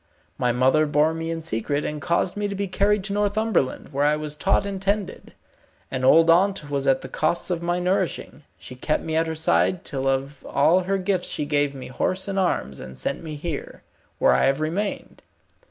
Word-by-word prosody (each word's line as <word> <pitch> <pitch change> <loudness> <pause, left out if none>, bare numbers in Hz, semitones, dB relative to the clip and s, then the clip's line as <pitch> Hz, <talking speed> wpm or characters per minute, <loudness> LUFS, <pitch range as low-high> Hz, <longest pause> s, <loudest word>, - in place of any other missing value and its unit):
My 125 - +2
mother 130 +5 +3
bore 150 +2 +2
me 165 0 -4
in 165 -1 -4
secret, 145 +2 -2
and 150 -1 -4
caused 170 +3 0
me 205 0 -1
to 200 - -4
be 200 0 -2
carried 200 +2 +1
to 200 0 -2
Northumberland, 205 -7 0
where 140 0 -1
I 150 +1 +3
was 150 -1 -5
taught 195 +5 +1
and 195 -1 -4
tended. 200 0 -2 0.6
An 130 -1 -3
old 165 +5 +6
aunt 175 -2 +3
was 140 -1 -1
at 135 -1 +3
the - - -7
costs 155 +7 -1
of 170 -1 -1
my 175 +1 0
nourishing. 185 -1 -1 0.2
She - - -10
kept 130 +5 -1
me 160 -1 -3
at 165 +1 +2
her 160 - -3
side, 160 +2 +1
till 135 -1 -3
of 135 +1 -2
all 155 +6 +4
her 190 +2 -1
gifts 185 -1 -1
she 150 - -2
gave 145 -1 0
me 130 - -8
horse 185 +10 -1
and 195 -1 -1
arms, 170 - -1
and 65 0 -9
sent 140 - -2
me 155 -2 -6
here, 155 0 -6 0.3
where - - +4
I 65 - +3
have 135 +2 +2
remained. 175 +7 -3
160 Hz, 210 wpm, -24 LUFS, 140-190 Hz, 0.6 s, old